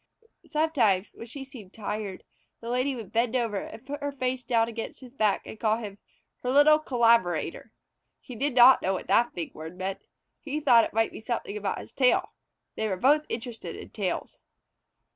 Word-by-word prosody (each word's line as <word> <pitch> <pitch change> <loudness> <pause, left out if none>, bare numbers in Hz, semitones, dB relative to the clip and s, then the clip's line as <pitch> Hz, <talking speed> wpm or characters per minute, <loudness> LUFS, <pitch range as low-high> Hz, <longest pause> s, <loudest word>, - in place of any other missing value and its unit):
Sometimes, 245 - +1
when 230 - -10
she 270 +4 -7
seemed 230 -8 -13
tired, 210 -3 -5 0.4
the 230 - -7
Lady 255 +2 0
would 225 -6 -8
bend 230 +1 +1
over 230 -5 0
and 225 +5 -7
put 290 +2 -6
her 285 0 -2
face 255 -2 -2
down 230 -1 +2
against 230 -1 -6
his 255 -1 -12
back 215 -6 +1
and 220 - -9
call 220 -1 +2
him 205 -3 -8 0.4
"her 250 - -2
little 290 +3 +6
collaborator." 235 - +1 0.5
He 250 - -10
did 275 +3 -1
not 250 +1 +8
know 190 - 0
what 190 - -4
that 240 +1 +2
big 170 -2 -5
word 160 +3 -9
meant. 190 +1 -4 0.4
He 300 0 -4
thought 245 -6 +5
it - - -8
might 225 0 +2
be - - -9
something 220 -2 -4
about 205 -2 -2
his - - -12
tail. 360 +10 +3 0.4
They 220 - -1
were 190 -3 -2
both 295 +9 +3
interested 225 -7 -6
in - - -10
tales. 200 -5 -3
235 Hz, 190 wpm, -27 LUFS, 210-260 Hz, 0.5 s, not